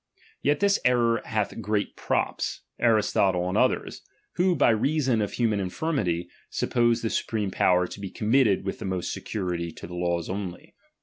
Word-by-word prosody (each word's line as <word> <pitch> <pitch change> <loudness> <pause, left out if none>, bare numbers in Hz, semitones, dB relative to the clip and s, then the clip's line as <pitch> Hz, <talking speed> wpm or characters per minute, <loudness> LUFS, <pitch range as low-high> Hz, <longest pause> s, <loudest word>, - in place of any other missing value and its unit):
Yet 145 +1 +1
this 200 0 +3
error 120 -2 +3
hath 110 0 -2
great 105 -1 -1
props, - - -1 0.2
Aristotle 100 -5 +2
and 90 - -2
others; - - +1 0.3
who. 180 0 +2
by 140 -5 +4
reason 130 0 +1
of 105 - -2
human 110 -4 +1
infirmity, 95 - -1 0.2
sup - - -3
pose 120 -1 +3
the 115 - -1
supreme 105 -4 -1
power 90 0 +3
to 95 - -9
be 100 -1 -5
committed 110 -1 +2
with 95 - -4
most 95 -2 -2
security 90 -4 -3
to - - -9
the 85 - -9
laws 85 -1 -1
only. 95 -2 -6
105 Hz, 165 wpm, -26 LUFS, 90-120 Hz, 0.3 s, by